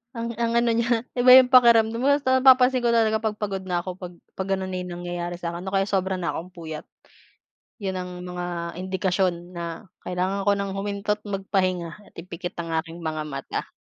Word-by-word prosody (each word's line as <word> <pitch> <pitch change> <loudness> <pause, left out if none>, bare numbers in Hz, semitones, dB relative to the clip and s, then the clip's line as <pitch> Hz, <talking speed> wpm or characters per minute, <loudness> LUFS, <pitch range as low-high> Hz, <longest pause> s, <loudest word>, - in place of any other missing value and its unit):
Ang 230 0 -3
ang 230 0 +1
ano 235 0 +3
niya, 235 0 +1 0.2
iba 250 +1 +5
'yong 260 -1 +7
pakiramdam 230 -3 +6
mo, 260 - +1
basta 260 -2 +2
napapansin 255 -1 +6
ko 240 -1 +1
talaga 220 -1 +3
'pag 220 -1 -2
pagod 200 -3 -4
na 175 -1 -1
ako 185 0 -7
'pag 180 -1 -8 0.3
'pag 190 - -2
gano'n 190 0 -5
na 185 - -3
'yong 180 0 -6
nangyayari 175 0 -4
sa 170 -1 -4
'kin, 175 +2 -7
o 190 - -4
kaya 195 0 +3
sobra 190 -1 0
na 180 -2 -2
'kong 180 +2 -7
puyat. 160 -3 -7 0.9
'Yon 195 -4 -3
ang 180 -1 -4 0.2
mga 175 -1 -5
indikasyon 185 -1 -1
na 170 +3 -6 0.2
kailangan 185 +2 -2
ko 205 - +2
nang 200 -1 -3
huminto't 205 +1 -2
magpahinga 190 -2 -2
at - - -38
ipikit 175 +1 -7
ang 165 -1 -4
aking 165 +1 -3
mga 155 -2 -3
mata. 140 -3 -5
190 Hz, 200 wpm, -24 LUFS, 175-220 Hz, 0.9 s, yong